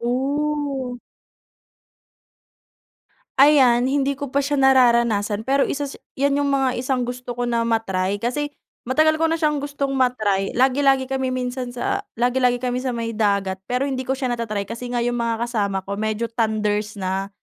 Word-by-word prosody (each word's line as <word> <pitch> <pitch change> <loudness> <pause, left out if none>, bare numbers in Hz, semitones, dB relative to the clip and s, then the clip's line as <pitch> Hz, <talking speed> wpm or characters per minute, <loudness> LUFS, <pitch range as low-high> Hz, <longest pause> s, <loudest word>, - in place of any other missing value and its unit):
Oh. 270 +1 -1 2.4
Ayan, 265 -4 +6
hindi 275 +1 +1
ko 280 -1 -6
pa 280 - +2
siya 285 +1 -1
nararanasan. 235 -6 +3
Pero 275 +2 +2
isa 285 +1 -2
sa 280 - -8 0.2
'yan 280 +1 +2
yung 285 - +1
mga 270 -2 +2
isang 255 -1 0
gusto 245 0 -6
ko 245 - -1
na 235 -1 0
ma-try. 195 -4 0
Kasi 245 +7 -2 0.4
matagal 315 +4 +3
ko 325 - +3
na 325 - +1
siyang 300 -3 0
gustong 285 -1 -3
ma-try, 220 -8 0
lagi-lagi 270 +1 +3
kami 265 0 -2
minsan 250 0 -3
sa 395 +12 -2 0.2
lagi-lagi 245 +1 +2
kami 250 0 -2
sa 255 -2 -2
may 230 0 -3
dagat. 200 -3 0
Pero 250 +2 0
hindi 260 -2 -3
ko 265 - +1
siya 260 -2 -1
nata-try 215 -4 -2
kasi 235 +4 -7
nga 240 -1 -1
yung 240 0 -1
mga 230 0 -1
kasama 200 -5 -1
ko 200 +1 -4
medyo 220 +2 -2
thunders 215 -2 -1
na. 190 0 -2
250 Hz, 165 wpm, -22 LUFS, 230-275 Hz, 2.4 s, Ayan